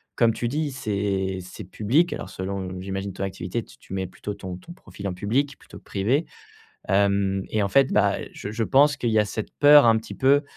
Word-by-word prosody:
comme 115 -1 +4
tu 120 - -2
dis, 145 +3 -1
c'est 100 -6 -2
c'est 90 0 -10
public 130 - +1
alors - - -6
selon 95 -1 -5
j'imagine 95 0 -4
ton 95 - -5
activité, 95 +3 -3
tu - - -17
tu - - -11
mets 95 -1 -2
plutôt 105 +3 -7
ton 90 -2 -7
ton 170 - -12
profil 100 - -9
en 95 - -2
public 130 +9 -1
plutôt - - -13
que - - -31
privé. 120 +11 0 0.6
Hem 100 -1 +2
et 110 -1 +1
en 100 - 0
fait, 135 +4 +3
bah, 100 -1 +3 0.2
je 100 - -7
je 115 +1 -2
pense 140 +3 +4
qu'il 120 - 0
y 110 - +3
a - - +2
cette 110 +1 -5
peur 145 -2 +8
un 115 -1 +6
petit 110 - -9
peu, 140 +2 +4
105 Hz, 220 wpm, -24 LUFS, 95-130 Hz, 0.6 s, peur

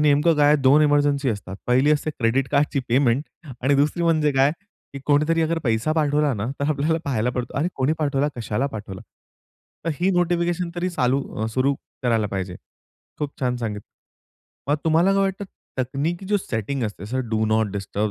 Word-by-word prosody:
नेमकं 150 +2 +4
काय 145 -1 +4
आहे 150 - +6
2 140 +3 +6
इमरजन्सी 145 -2 +2
असतात, 100 -3 -5
पहिली 130 +4 +3
असते 150 +1 0
क्रेडिट 130 0 0
कार्डची 140 -1 +2
पेमेंट 125 +1 +3 0.4
आणि 140 +3 +3
दुसरी 150 +5 +1
म्हणजे 155 -3 +2
काय 135 +1 +4 0.4
की 140 - -6
कोणीतरी 150 +3 +3
अगर 165 +1 0
पैसा 115 +5 +1
पाठवला 150 -2 +2
ना, 105 0 -3
तर 140 - 0
आपल्याला 155 +3 +1
पाहायला 125 -4 0
पडतो 125 0 -4
अरे! 160 +5 +1
कोणी 135 +3 +1
पाठवला 145 -2 +1
कशाला 120 +2 -1
पाठवलं? 105 -7 -7 0.8
तर 165 - 0
ही 185 +2 +3
नोटिफिकेशन 175 -1 0
तरी 175 +1 0
चालू 135 -4 +1 0.2
अ, - - 0
सुरू 130 +5 +1 0.3
करायला 115 -4 +2
पाहिजे 95 -2 -4 0.6
खूप 145 -1 -5
छान 125 -2 0
सांगितलं. 105 -4 -5 0.8
मग 145 - +3
तुम्हाला 165 +4 +4
काय 195 - +3
वाटतं, 195 +1 -1 0.3
तकनिकी 145 +8 -2
जो 205 +1 +2
सेटिंग 130 - -3
असते 105 -3 -5
जसं 125 +3 -3
डू 110 -1 +1
नॉट 110 -1 +1
डिस्टर्ब 100 +1 -2
140 Hz, 180 wpm, -23 LUFS, 120-155 Hz, 0.8 s, आहे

